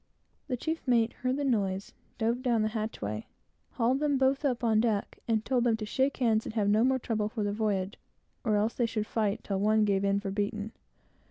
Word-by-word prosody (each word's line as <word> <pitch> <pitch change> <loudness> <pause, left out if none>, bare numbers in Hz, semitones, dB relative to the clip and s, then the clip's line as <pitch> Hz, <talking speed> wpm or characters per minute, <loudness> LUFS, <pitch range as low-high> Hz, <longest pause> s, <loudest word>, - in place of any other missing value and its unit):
The 255 -4 -1
chief 320 +6 -2
mate 235 -2 +3
heard 255 +1 -1
the 290 - -1
noise, 200 -6 0 0.2
dove 235 +2 0
down 235 -4 +2
the 215 - +1
hatchway, 165 - -4 0.5
hauled 250 +2 +1
them 290 -2 +2
both 270 +2 +2
up 255 -3 0
on 220 -2 +3
deck, 220 -3 0
and 220 -2 +1
told 250 -2 +2
them 230 -2 +2
to 215 - -4
shake 265 +6 0
hands 225 -4 +2
and 220 - -6
have 210 -3 +1
no 215 +2 +4
more 260 +1 +3
trouble 220 -4 -1
for 215 -1 -3
the 205 0 -1
voyage, 205 -2 -1 0.4
or 215 -3 +2
else 215 +2 +1
they 240 - +1
should 215 -2 -2
fight 215 -2 -1
till 195 -2 -2
one 215 +1 +3
gave 200 -1 +1
in 200 0 +2
for 200 -1 -4
beaten. 205 +1 -2
220 Hz, 220 wpm, -29 LUFS, 210-245 Hz, 0.5 s, no